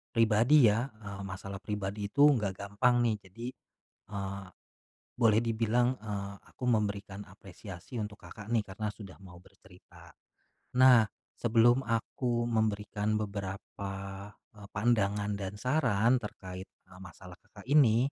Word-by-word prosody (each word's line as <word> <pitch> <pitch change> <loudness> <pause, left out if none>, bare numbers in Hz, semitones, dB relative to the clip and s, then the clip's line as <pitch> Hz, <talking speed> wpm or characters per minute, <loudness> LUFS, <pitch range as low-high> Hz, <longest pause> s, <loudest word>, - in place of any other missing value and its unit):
pribadi 115 +4 +5
ya, 120 +5 0
eee, 100 -2 -8
masalah 95 0 -7
pribadi 100 0 -3
itu 145 - +4
nggak 105 -9 +2
gampang 120 +5 +2
nih, 110 - +1
jadi, 115 +6 -8 0.7
eee, 100 -1 -4 0.7
boleh 110 -2 +5
dibilang, 115 +2 +1
eee, 100 -2 -5 0.2
aku - - -12
memberikan 100 -3 -1
apresiasi 95 +2 -11
untuk 105 -1 -5
Kakak 105 -1 -10
nih, 115 -3 +2
karena 105 +3 -4
sudah 100 -2 -11
mau 90 -2 -12
bercerita. 95 -2 -18 0.7
Nah, 125 -3 +8 0.4
sebelum 120 +2 +4
aku 120 +1 -1
memberikan 105 -1 0
beberapa, 100 -1 -5 0.6
eee, 105 -1 -13
pandangan 105 -2 +1
dan 95 0 -5
saran 125 -1 +2
terkait, 95 -3 -8
eee, 90 - -19
masalah 90 -1 -12
Kakak 110 0 -16
ini, 130 -2 +5
105 Hz, 125 wpm, -31 LUFS, 100-115 Hz, 0.7 s, Nah